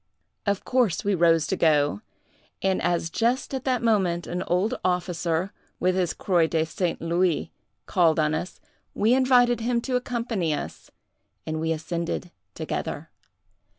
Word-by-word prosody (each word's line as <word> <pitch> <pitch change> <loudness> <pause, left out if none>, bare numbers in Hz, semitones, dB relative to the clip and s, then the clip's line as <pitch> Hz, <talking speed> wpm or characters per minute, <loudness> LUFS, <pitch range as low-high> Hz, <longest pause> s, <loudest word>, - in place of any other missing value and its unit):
"Of 200 -1 0
course 245 -10 +1
we 205 - +1
rose 165 -3 +4
to - - -1
go; 145 -8 +2 0.6
and 190 -1 +1
as 170 -1 0
just 240 +7 0
at 265 -1 -3
that 255 -2 0
moment 190 -7 +1
an 180 +1 -3
old 190 +7 +1
officer, 180 0 -1 0.3
with 185 0 +2
his 180 -2 0
Croix 175 -4 +2
de 160 -1 0
St. 175 +1 -2
Louis, 170 -1 0 0.3
called 165 -4 +3
on 155 0 +2
us, 170 +3 -4 0.4
we 220 +4 +3
invited 250 -2 +4
him 235 +1 0
to 255 +1 -2
accompany 230 -10 -1
us - - -7 0.6
and 155 0 -3
we 160 0 0
ascended 170 +2 -3 0.2
together. - - -4
180 Hz, 150 wpm, -25 LUFS, 165-230 Hz, 0.6 s, rose